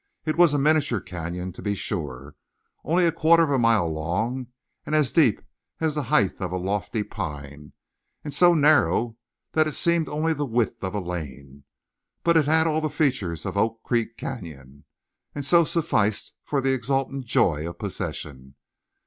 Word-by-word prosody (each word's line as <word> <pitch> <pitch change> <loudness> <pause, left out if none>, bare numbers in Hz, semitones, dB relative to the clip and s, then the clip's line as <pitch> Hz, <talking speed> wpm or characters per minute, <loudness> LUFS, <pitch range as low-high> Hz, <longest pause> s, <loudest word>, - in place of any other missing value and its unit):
It 155 - 0
was 175 -2 +5
a 145 - +1
miniature 145 -5 +2
canyon, 90 +1 -6
to - - -11
be 105 -1 -1
sure, 70 -7 -5 0.5
only 175 +2 +2
a 165 - +3
quarter 165 +1 +4
of 150 - 0
a 135 - +2
mile 115 -7 +3
long, 100 +11 -2 0.4
and 155 - -2
as 150 -4 +2
deep 140 - +3 0.4
as 160 -2 0
the 150 - -1
height 130 -10 +1
of 90 -2 -3
a 90 - -1
lofty 100 +3 -2
pine, 75 -8 -7 0.5
and 145 - -5
so 175 +4 +5
narrow 125 - +3 0.4
that 155 -1 +2
it 155 - -2
seemed 170 -3 +1
only 155 +2 0
the 145 - -3
width 120 -3 -1
of 95 +2 -3
a - - 0
lane, 70 -6 -7 0.6
but 170 0 +3
it 160 -3 +4
had 160 +2 +3
all 155 -1 +1
the 155 - -1
features 125 - -1
of - - -4
Oak 110 +2 0
Creek 115 -1 -1
Canyon, 70 - -8 0.5
and 145 -2 -3
so 170 +3 +5
sufficed 150 - 0
for 140 -2 -1
the 135 0 +1
exultant 135 +1 -2
joy 80 -7 +1
of 85 - -10
possession. 65 -5 -6
115 Hz, 175 wpm, -24 LUFS, -, 0.6 s, was